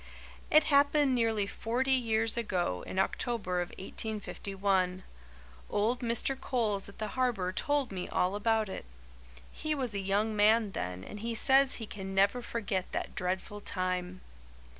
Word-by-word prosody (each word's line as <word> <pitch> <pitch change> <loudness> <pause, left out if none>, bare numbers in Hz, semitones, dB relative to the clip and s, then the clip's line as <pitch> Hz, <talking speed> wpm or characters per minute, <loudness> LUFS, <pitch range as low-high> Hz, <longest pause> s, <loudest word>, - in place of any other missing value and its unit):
"It 310 0 +6
happened 285 -1 +4
nearly 225 -4 +1
forty 240 +6 -1
years 225 -3 +2
ago, 180 - -1
in - - -6
October 190 -2 0
of 175 - -4
1851. 195 -2 -2 0.7
Old 225 +4 +1
Mr. 245 +2 0
Coles 210 -6 -1
at 200 - -14
the 215 -2 -3
Harbour 240 -8 0
told 285 +2 0
me 185 -2 -4
all 180 +2 +1
about 220 +1 +1
it. 190 - -6 0.7
He 310 0 -2
was 255 -6 -2
a 200 - -2
young 205 +3 0
man 210 0 +4
then 90 - -4
and 210 - -8
he 230 +2 -3
says 270 +3 +5
he 225 - -5
can 195 -2 -7
never 200 +6 +3
forget 205 -6 -2
that - - -3
dreadful 185 +3 -3
time. 185 -1 -2
210 Hz, 150 wpm, -31 LUFS, 190-240 Hz, 0.7 s, It